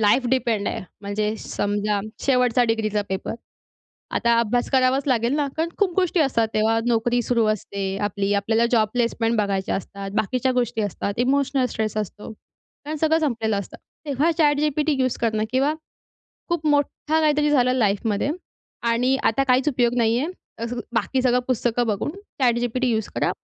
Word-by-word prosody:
Life 225 +5 +3
depend 230 -5 +1
आहे. - - -3 0.2
म्हणजे 210 +1 -2
समजा 205 0 -1 0.2
शेवटचा 250 -2 +3
डिग्रीचा 215 -2 0
पेपर. 190 +2 -3 0.8
आता 235 0 +3
अभ्यास 240 +2 0
करावाच 260 +1 +2
लागेल 240 -1 +2
ना 295 -2 +1
कारण 325 +1 0
खूप 390 -4 +2
गोष्टी 365 -2 +2
असतात. 240 -6 +2
तेव्हा 220 +1 +2
नोकरी 240 +1 +2
सुरू 235 -1 +1
असते 200 -1 -4 0.2
आपली. 200 0 -1
आपल्याला 220 +3 +2
जॉब 220 -3 +3
प्लेसमेंट 235 -1 0
बघायच्या 195 -2 0
असतात, 195 +1 -7
बाकीच्या 255 +5 0
गोष्टी 235 -2 0
असतात. 200 0 -3
इमोशनल 270 +1 +2
स्ट्रेस 215 -1 -2
असतो 210 -1 -5
कारण 295 +7 -11
सगळं 320 +1 +2
संपलेलं 230 -8 0
असतं. 200 - -7 0.3
तेव्हा 285 +2 +1
ChatGPT 300 0 +2
यूज 255 -1 +1
करणं 220 -2 +1
किंवा 270 +4 +2 0.8
खूप 340 -3 -1
मोठा 295 +2 +1
काहीतरी 300 -1 +2
झालं 255 -3 +3
लाईफमध्ये 215 +1 +1 0.6
आणि 250 +3 +2
आता 225 +5 +3
काहीच 260 +2 +3
उपयोग 245 -4 +1
नाही 230 -1 +2
आहे. 290 +6 -1 0.3
अस 230 +1 -3 0.2
बाकी 235 +3 0
सगळं 250 -1 +3
पुस्तकं 240 -1 +1
बघून, 210 +5 -1 0.3
ChatGPT 245 +1 +1
यूज 220 -3 0
करा - - +1
240 Hz, 155 wpm, -23 LUFS, 215-270 Hz, 0.8 s, Life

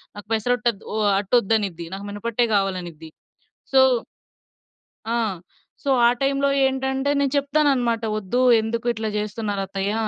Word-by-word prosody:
"నాకు 205 0 -10
పెసర 225 +2 0
అట్టు 240 +1 +1
అద్దు, 205 -2 -17
ఓ - - -3 0.2
అట్టోద్దనిద్ది. 200 -4 0
నాకు 195 +1 -6
మినపట్టే 230 +4 -1
కావాలనిద్ది." 180 -5 -2 0.6
సో 265 - +6 1.3
ఆ! - - -2 0.7
సో, 280 - -2 0.2
ఆ - - +7
టైమ్‌లో 275 +1 +1 0.2
ఏంటంటే 265 +1 -1
నేను 280 -2 +1
చెప్తానన్నమాట, 275 -5 +1
"వొద్దు. 215 +4 -1 0.2
ఎందుకు 230 +2 -3
ఇట్లా 220 -1 -3
జేస్తున్నారత్తయ్య? 205 -2 -3
220 Hz, 125 wpm, -22 LUFS, 200-265 Hz, 1.3 s, ఆ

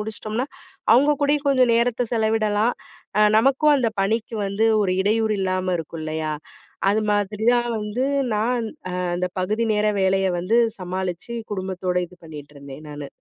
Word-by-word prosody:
முடிச்சிட்டோம்னா, 220 +3 -4 0.5
அவுங்க 290 +4 +5
கூடயும் 290 0 +1
கொஞ்சம் 255 -3 +4
நேரத்தை 240 +1 +1
செலவிடலாம். 220 0 +1 0.4
அ - - +6 0.2
நமக்கும், 275 +5 +4
அந்த 230 -3 +1
பணிக்கு 225 +3 -1
வந்து 205 +3 +1 0.2
ஒரு 185 -2 +1
இடையூறு 215 +1 +1
இல்லாம 185 -1 0
இருக்கும் 160 0 -6
இல்லையா? 155 0 -2 0.6
அது 210 +2 +2
மாதிரி 205 +1 -1
தான் 240 0 +1
வந்து, 210 +5 -2 0.3
நான் 230 +2 0 0.2
அ - - -5 0.2
அந்த 180 +1 -1
பகுதி 215 +5 0
நேர 210 0 +1
வேலைய 190 0 +2
வந்து 210 +6 +1 0.2
சமாளிச்சு 185 +4 -4 0.2
குடும்பத்தோட 185 -2 -3
இது 180 +1 -18
பண்ணிட்டிருந்தேன், 145 -2 -10
நானு. 145 -1 -7
210 Hz, 145 wpm, -23 LUFS, 185-230 Hz, 0.6 s, அ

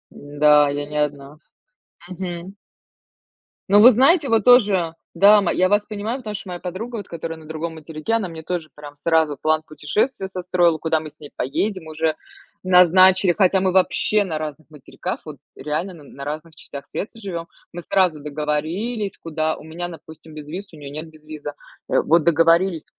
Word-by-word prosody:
Н-да, 145 0 +3
я 145 +1 -3
не 150 +1 -6
одна. 145 0 -6 0.7
Мгм. 180 0 -6 1.2
Ну, 205 +1 +6
вы 245 +4 +10
знаете, 275 - +4
вот 225 -2 +2
тоже 200 -9 +4 0.2
да, 205 +1 +6
ма 195 - 0
я 185 - +2
вас 205 +2 +2
понимаю, 215 +4 -4
потому 215 -4 -6
что 195 - -7
моя 175 -1 -5
подруга, 210 +7 -6
вот 205 - -7
которая 165 -1 -6
на 160 - -14
другом 160 +1 -5
материке, 155 +6 -5
она 225 -4 0
мне 160 -1 -9
тоже, 165 -2 -4
прям, 145 -1 -11
сразу 160 0 +1
план 155 +3 +1
путешествия 190 - -2
состроила, 180 -3 +1
куда 160 0 0
мы 155 0 -8
с - - -31
ней 145 - -11
поедем 185 +7 -2
уже 155 0 -1 0.5
назначили. 185 0 +5
Хотя 190 -1 +4
мы 185 0 +1
вообще 205 +2 +2
на 165 -5 -3
разных 155 0 -7
материках, 150 -3 -7
вот - - -9 0.2
реально 170 +5 -4
на 155 - -14
на 140 0 -11
разных 155 +2 -6
частях 140 0 -10
света 205 - -5
живём. 185 -7 -6 0.3
Мы 175 - -6
сразу 185 -4 +1
договорились, 155 +9 -3
куда. 160 -1 -2
У - - -13
меня, 170 +3 -6
допустим, 160 -1 -13
безвиз, 160 +7 -8
у 160 - -14
неё 140 -2 -9
нет 155 +2 -6
безвиза. 155 -2 -9 0.3
Э, - - +3
вот 165 0 +3
договорились, 165 +1 +3
165 Hz, 180 wpm, -21 LUFS, 155-190 Hz, 1.2 s, вы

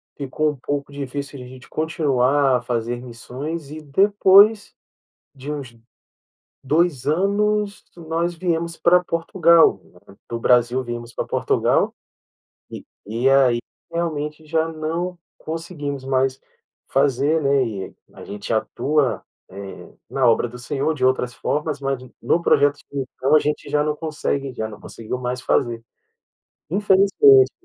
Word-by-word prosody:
Ficou 150 +2 -1
um 150 - -9
pouco 145 +2 -4
difícil 140 0 -5
de 125 - -9
a - - -11
gente 130 0 -13
continuar 140 -4 +2
a 125 - -6
fazer 120 0 -3
missões, 135 +6 -7
e 155 +1 -7
depois 200 +6 +4 0.6
de 135 +2 -7
uns 135 -6 -7 0.9
2 150 -2 +1
anos, 200 +5 0
nós 170 +1 -2
viemos 170 -1 -2
pra 180 +1 +4
Portugal. 165 0 +3 0.5
Do 115 - -3
Brasil 125 +1 +3
viemos 120 -1 -6
pra - - -3
Portugal, - - +1 0.8
e - - -8 0.2
e 115 +5 +1
aí 130 -3 +4 0.3
realmente 155 -2 -3
já 160 +1 0
não 165 +3 -3 0.2
conseguimos 155 -4 -5
mais 130 0 0 0.5
fazer, 140 +3 +2
né, 140 -1 +3
e 100 -5 -6 0.2
a - - -12
gente 105 +2 -5
atua, 130 +1 0 0.3
eh, 95 0 -9 0.2
na 135 -2 0
obra 115 +1 +3
do 125 - -10
Senhor 140 +5 -1
de 130 -3 0
outras 125 -1 +1
formas, 150 +2 -2
mas 135 -1 -1 0.2
no 170 - +1
projeto 145 -3 +3
então 135 +1 0
a - - +7
gente 150 0 -3
já 150 0 +2
não 150 0 -1
consegue 145 -3 -3
já 110 -2 -3
não 105 - -11
conseguiu 115 +2 -6
mais 125 0 -4
fazer. 115 -2 0 0.9
Infelizmente, 205 - +5
145 Hz, 135 wpm, -21 LUFS, 125-165 Hz, 0.9 s, a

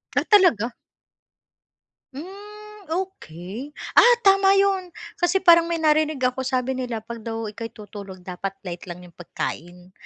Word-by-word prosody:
Ah - - +2
talaga? 300 - +4 1.4
Hmm 415 +5 -11
okey. 285 - -6 0.2
Ah, 485 0 +7
tama 390 0 +5
yun, 385 -3 +1 0.2
kasi 370 +2 +1
parang 335 -2 +6
may 340 - -1
narinig 310 -3 +1
ako 250 +1 0
sabi 260 0 -1
nila 245 -4 -4
pag 235 +1 -8
daw 225 -1 -5
ika'y 225 +2 -6
tutulog 200 -3 -10
dapat 190 +2 -5
light 180 0 -7
lang 175 +1 -8
'yong 175 - -14
pagkain. 175 +1 -7
260 Hz, 135 wpm, -23 LUFS, -, 1.4 s, Ah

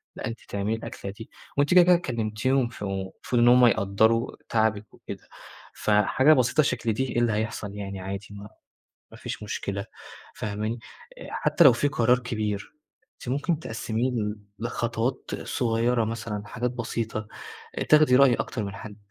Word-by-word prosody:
لأ، - - -5
أنتِ 115 - -5
تعملي 100 +2 -1
الأكلة 100 -3 -7
دي، 110 +3 -11 0.3
وأنتِ 145 +4 +3
كده 180 -1 +9
كده 180 +1 +6
كلمتيهم، 120 -2 0
ف - - -16
فالمفروض 100 +4 -2
إن 120 - +5
هُم 125 +1 +7
يقدّروا 110 +1 +2
تعبِك 110 -2 0
وكده. - - -9 0.5
فحاجة 110 +8 +4
بسيطة 130 +2 +3
شكل 120 -4 0
دي 130 - 0
إيه 120 - 0
اللي 120 -2 +2
هيحصل 105 -2 -3
يعني 100 -1 -5
عادي 95 +1 -5
ما 100 +1 -9 0.6
ما - - -12
فيش - - -6
مشكلة، 100 -1 -4 0.5
فاهماني؟ 110 +2 -3 0.4
آآ، - - -9
حتّى - - +2
لو 130 - +9
في 130 +5 +1
قرار 125 -3 +3
كبير، 110 -5 -3 0.4
أنتِ - - -11
ممكن 145 +5 0
تقسّميه 115 0 -2
ل 105 -3 -2 0.2
لخطوات 120 +2 -2
صغيّرة 115 0 +1
مثلًا، 110 -2 -4
حاجات 120 +4 -2
بسيطة، 115 -3 -4 0.5
آآ، - - -1
تاخدي 150 -4 +6
رأي 135 -1 +6
أكتر 115 -5 -3
من 100 0 -6
حَد 105 +1 -9
115 Hz, 160 wpm, -26 LUFS, 105-125 Hz, 0.6 s, كده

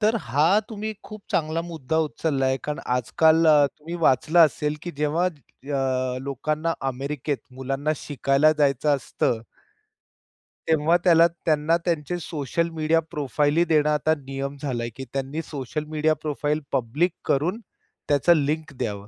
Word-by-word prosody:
तर 220 +2 +3
हा 150 +11 +3
तुम्ही 220 0 -4
खूप 215 -1 -10
चांगला 160 +1 0
मुद्दा 160 -3 -4
उचलला 145 -3 -1
आहे. 130 0 +2
कारण 150 0 -3
आजकाल 160 +7 +3
अ, 150 -2 +6
तुम्ही 160 +3 -7
वाचलं 155 +6 +3
असेल 150 +1 -3
की 175 - -5
जेव्हा 150 +4 +1
अ, 135 -4 -3
लोकांना 155 +4 -2 0.2
अमेरिकेत 140 +2 -3 0.2
मुलांना 135 +3 -2
शिकायला 140 +2 +2
जायचं 145 0 +3
असतं, 120 -3 -1 1.3
तेव्हा 160 +2 +3
त्याला, 170 -2 +6 0.2
त्यांना 155 +1 +2
त्यांचे 170 0 -1
सोशल 165 +1 -2
मीडिया 160 +1 +2
प्रोफाइल 145 +1 0
ही 170 - +5
देणं 150 -1 +3
आता 150 +1 +2
नियम 135 +1 -4
झालाय, 120 -5 -2
की 135 - -7
त्यांनी 135 +3 -3
सोशल 150 +1 -5
मीडिया 155 0 +2
प्रोफाइल 150 0 -1
पब्लिक 145 +9 +1
करून 165 +10 0 0.5
त्याचं 145 +4 +4
लिंक 155 0 -2
द्यावं. 105 -5 -4
150 Hz, 140 wpm, -24 LUFS, 135-160 Hz, 1.3 s, अ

